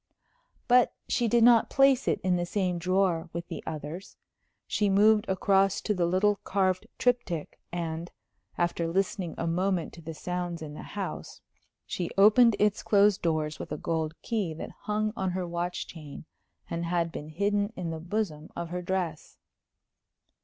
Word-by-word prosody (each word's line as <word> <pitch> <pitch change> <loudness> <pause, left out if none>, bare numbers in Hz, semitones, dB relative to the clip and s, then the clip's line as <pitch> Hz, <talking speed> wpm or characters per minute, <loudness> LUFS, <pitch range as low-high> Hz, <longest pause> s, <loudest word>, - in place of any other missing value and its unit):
But 250 0 +4
she 240 - +1
did 235 +1 +4
not 235 -1 +6
place 270 -1 +4
it - - +2
in 185 -1 +2
the 175 - 0
same 180 -2 -1
drawer 180 -2 +1
with 170 0 -5
the 165 - -6
others. 160 +4 -6 0.5
She 205 -1 +1
moved 210 +2 +4
across 195 +1 +3
to 210 - 0
the 175 -3 +1
little 200 +3 +2
carved 190 +1 0
triptych, 245 -11 -1
and, 170 0 -4 0.5
after 170 -1 0
listening 185 0 -1
a - - -2
moment 180 +1 0
to 170 - -11
the 160 0 -7
sounds 175 -1 -4
in 150 -1 -7
the - - -8
house, 200 -2 -6 0.4
she 175 -2 -3
opened 215 +3 +7
its 210 -1 +2
closed 205 -1 +4
doors 155 -2 -1
with - - -7
a 150 - -2
gold 160 0 -2
key 205 -9 -1
that - - -7
hung 215 0 -2
on 190 -4 -1
her 185 -1 -2
watch 175 +1 -3
chain 155 -3 -10 0.4
and 170 0 -3
had 170 -1 0
been 150 -1 -7
hidden 205 +5 0
in 175 -3 -4
the 160 - -5
bosom 170 -3 -3
of 170 -1 -4
her 180 +1 -3
dress. 180 -4 -3
180 Hz, 165 wpm, -28 LUFS, 165-205 Hz, 0.5 s, opened